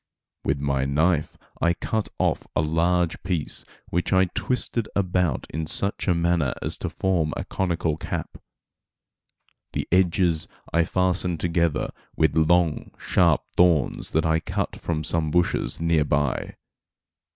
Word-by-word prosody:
With 70 - 0
my 70 -1 0
knife 80 +3 +1 0.2
I 85 +1 +3
cut 110 +5 -2
off - - 0
a - - +3
large 85 +2 +1
piece 85 -5 -2 0.3
which 90 +1 -1
I 95 0 +5
twisted 120 -3 -1
about 90 -6 0
in 80 0 -3
such 100 +6 -2
a 90 - +3
manner 85 -5 +1
as - - -3
to - - -3
form 85 -5 0
a - - -4
conical 85 -4 -1
cap. - - -5 1.3
The - - -2
edges 90 -2 +2 0.3
I 85 0 +3
fastened 90 -1 +1
together 85 -3 0 0.2
with 80 - +2
long, 80 0 +2
sharp - - +2
thorns 85 -6 +3
that 80 +1 +2
I 80 0 +3
cut - - -3
from 80 -2 -3
some 80 0 +2
bushes 90 +2 0
near 85 -2 +2
by. 75 -2 -1
85 Hz, 140 wpm, -24 LUFS, 80-90 Hz, 1.3 s, I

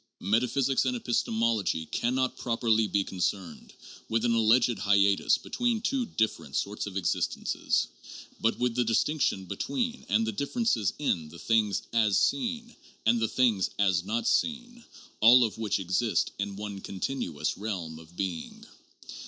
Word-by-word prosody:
Metaphysics 125 +6 +1
and 125 -1 0
episte 120 0 -1
mology 110 -7 0
can 120 +2 0
not 130 0 0
properly 115 -3 +1
be 100 -1 +1
concerned 95 0 -4 0.4
with 115 +1 +1
an 120 - +2
alleged 115 0 +3
hiatus 100 0 +3
between 240 -2 -1
two 255 +2 -1
different 110 - -2
sorts 105 +1 -2
of 100 -1 -5
existences, 90 -1 0 0.5
but 115 - +1
with 125 -1 0
the 125 +1 +1
distinction 115 -3 0
between 240 - -3
and 110 +3 +2
the 110 - -1
differences 140 - 0
in 85 - -1
the 85 - -12
things 110 0 +1
as 110 -3 +3
seen 240 -2 -1 0.3
and 115 +1 +4
the 115 - +1
same - - -12 0.2
things 95 - 0
as 95 -4 +2
not 110 +5 -2
seen, 240 0 -1 0.4
all 120 +3 +8
of 110 -1 -2
which 110 -3 0
exist 95 +5 0
in 100 0 -3
one 100 -1 -6
continuous 90 - -3
realm 90 -7 -5
of 80 +2 -16
being. 90 -4 -5
110 Hz, 155 wpm, -28 LUFS, 100-125 Hz, 0.5 s, all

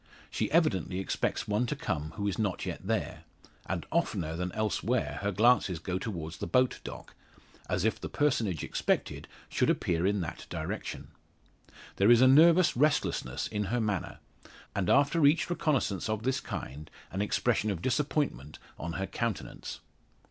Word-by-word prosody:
She - - -1
evidently 95 - +2
expects 95 - -2
one 105 +4 +1
to 150 - -2
come 80 - -3
who 100 - -2
is 100 - -2
not 100 -4 -1
yet - - -5
there; - - -2 0.4
and - - -3
oftener 80 -1 0
than 90 +1 -3
elsewhere 110 +3 -1
her 100 0 0
glances 105 -3 +3
go 90 +3 -3
towards 85 -7 -5
the - - -4
boat 130 -1 +2
dock, - - -9 0.6
as 90 +1 0
if 110 - 0
the - - -5
personage 115 - 0
expected - - -1 0.2
should - - +1
appear 85 +1 +1
in 100 0 +1
that 85 - -6
direction. - - -5 0.9
There 100 +3 +4
is 120 -1 +8
a 130 - +7
nervous 165 +6 +6
restlessness 130 - +1
in 105 -1 -2
her 120 +6 0
manner, 105 -5 -2 0.6
and 95 -3 0
after 145 +4 +4
each 150 +4 +4
reconnaissance 130 - 0
of 110 0 -2
this 130 +1 +1
kind, 75 +3 -7 0.2
an 95 - -2
expression 110 +1 +1
of 95 -5 -3
disappointment 130 - -1 0.2
on 85 0 -4
her 95 - -2
countenance. 115 0 -4
105 Hz, 160 wpm, -30 LUFS, 90-130 Hz, 0.9 s, is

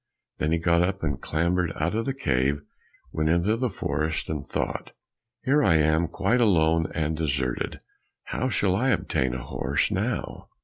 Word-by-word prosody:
Then 75 - 0
he 85 - +3
got 85 0 +3
up 95 +1 -1
and 70 -4 -1
clambered 85 +2 0
out 85 +5 -1
of 115 +1 -1
the 135 - 0
cave, 70 - 0 0.5
went 80 0 0
into 85 +6 +2
the 125 +1 -1
forest, 80 -5 -2
and 75 -2 -3
thought, - - -3 0.5
"Here 145 +3 +3
I 80 - +4
am 80 +2 +3
quite 100 +9 +1
alone 80 -6 +3
and 80 0 0
deserted, 70 -5 -2 0.4
how 130 - -2
shall 95 -6 +1
I 130 +7 +1
obtain 65 - 0
a 60 - -5
horse - - -1
now?" - - -3
80 Hz, 170 wpm, -26 LUFS, 75-95 Hz, 0.5 s, I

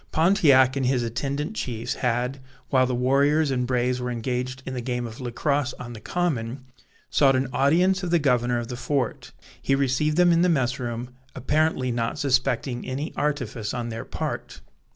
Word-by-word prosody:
Pontiac 155 -7 +4
and 135 -2 0
his 125 -2 +1
attendant 140 - -3
chiefs 120 - -3
had, 125 +2 -1 0.3
while 130 -1 +3
the 125 - -1
warriors 140 +4 +2
and 125 -2 0
braves 125 0 0
were 125 - -2
engaged 125 +2 -3
in 130 - -5
the 125 - -3
game 120 0 -2
of 115 +2 -8
Lacrosse 130 +2 -1
on 120 -1 -8
the 110 - -9
common, 130 -6 -2 0.5
sought 135 -2 +4
an 130 0 +1
audience 175 +9 +3
of 180 - -3
the 170 - +4
governor 125 -5 +2
of 120 0 -4
the 125 - -4
fort. 130 -1 -2 0.3
He 135 - +2
received 140 +3 +1
them 180 -1 +5
in 170 0 +4
the 180 - +4
mess 135 -4 +1
room, 120 0 -4 0.2
apparently 135 -1 +1
not 115 -1 -2
suspecting 130 -2 0
any 135 +5 -4
artifice 140 -7 -2
on 120 -1 -3
their 115 0 -5
part. - - -5
130 Hz, 180 wpm, -25 LUFS, 120-145 Hz, 0.5 s, them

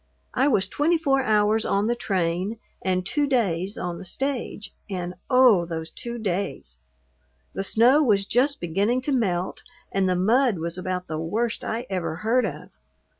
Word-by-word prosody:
I 265 +3 +2
was 200 -9 +2
twenty 320 - +2
four 275 -4 +2
hours 215 -2 +2
on 200 +1 +1
the 240 +2 +1
train 185 0 -1 0.2
and 185 -1 0
two 290 +8 +1
days 200 -7 0
on 175 -1 -4
the - - -8
stage, 245 +1 -4 0.2
and 180 -2 -4 0.2
oh, 250 -8 +6
those 165 -1 -5
two 240 0 -6
days! 190 - -3 0.7
The 195 - -3
snow 240 +8 +4
was 205 -8 +3
just 270 +6 +1
beginning 200 +9 0
to 285 - -2
melt 190 -8 0 0.3
and 195 -1 +1
the 180 - +2
mud 225 +4 +3
was 165 +1 -3
about 185 0 -3
the 155 -2 -4
worst 220 +8 -2
I 230 +3 -3
ever 180 -4 -2
heard 225 +6 +1
of. 150 -4 -8
205 Hz, 170 wpm, -24 LUFS, 180-245 Hz, 0.7 s, oh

